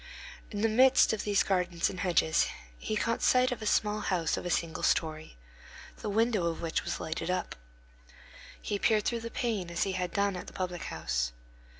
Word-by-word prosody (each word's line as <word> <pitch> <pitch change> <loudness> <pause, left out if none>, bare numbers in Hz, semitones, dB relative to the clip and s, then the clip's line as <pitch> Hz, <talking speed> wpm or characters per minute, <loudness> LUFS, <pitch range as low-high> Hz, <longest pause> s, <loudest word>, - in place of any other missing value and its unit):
In 205 -2 -4
the 225 - +4
midst 255 +2 +5
of 220 - -3
these 205 -1 +3
gardens 180 -3 0
and 185 - -5
hedges 170 -3 +2 0.3
he 215 - -3
caught 230 +2 0
sight 255 0 +4
of 250 - -4
a 215 - -3
small 210 0 +2
house 175 -6 0
of - - -5
a - - -2
single 165 -1 -1
story, 155 - 0 0.6
the - - -5
window 215 -3 +2
of 165 - -2
which 165 -1 -1
was - - -3
lighted 160 +2 -4
up. 185 0 -2 1.0
He 205 - -3
peered 215 0 +2
through 235 - 0
the 230 - -5
pane 220 -7 -2
as 170 - 0
he 195 - -1
had 180 -2 -2
done 200 0 +1
at 180 - -7
the - - -10
public 180 -2 -4
house. - - -2
190 Hz, 200 wpm, -30 LUFS, 170-215 Hz, 1.0 s, midst